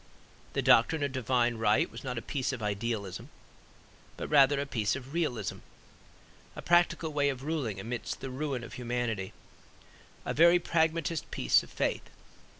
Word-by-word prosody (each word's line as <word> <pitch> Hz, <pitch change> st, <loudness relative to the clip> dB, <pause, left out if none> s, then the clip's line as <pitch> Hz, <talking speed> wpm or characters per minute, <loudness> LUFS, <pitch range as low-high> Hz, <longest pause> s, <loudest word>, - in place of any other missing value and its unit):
The -, -, -1 dB
doctrine 145 Hz, +6 st, +4 dB
of 140 Hz, -, -1 dB
Divine 125 Hz, -2 st, +1 dB
Right 105 Hz, -1 st, +2 dB
was 115 Hz, +3 st, -9 dB
not 125 Hz, -3 st, -4 dB
a 115 Hz, -, -4 dB
piece 135 Hz, -2 st, -2 dB
of 125 Hz, -5 st, -5 dB
idealism, 105 Hz, -1 st, -3 dB, 0.9 s
but -, -, -5 dB
rather 140 Hz, -1 st, +5 dB
a 140 Hz, -, -1 dB
piece 115 Hz, -6 st, -1 dB
of 135 Hz, +1 st, -8 dB
realism, 125 Hz, -, -2 dB, 1.0 s
a -, -, -6 dB
practical 170 Hz, -2 st, +2 dB
way 145 Hz, -1 st, +2 dB
of 135 Hz, -1 st, -4 dB
ruling 140 Hz, -10 st, -2 dB
amid 115 Hz, +4 st, -5 dB
the 135 Hz, -, -5 dB
ruin 135 Hz, -2 st, -3 dB
of 115 Hz, -, -9 dB
humanity; 120 Hz, -5 st, -3 dB, 0.9 s
a -, -, -2 dB
very 170 Hz, +3 st, +6 dB
pragmatist 165 Hz, -1 st, 0 dB
piece -, -, +3 dB
of -, -, -13 dB
faith. -, -, -2 dB
130 Hz, 155 wpm, -30 LUFS, 115-150 Hz, 1.0 s, very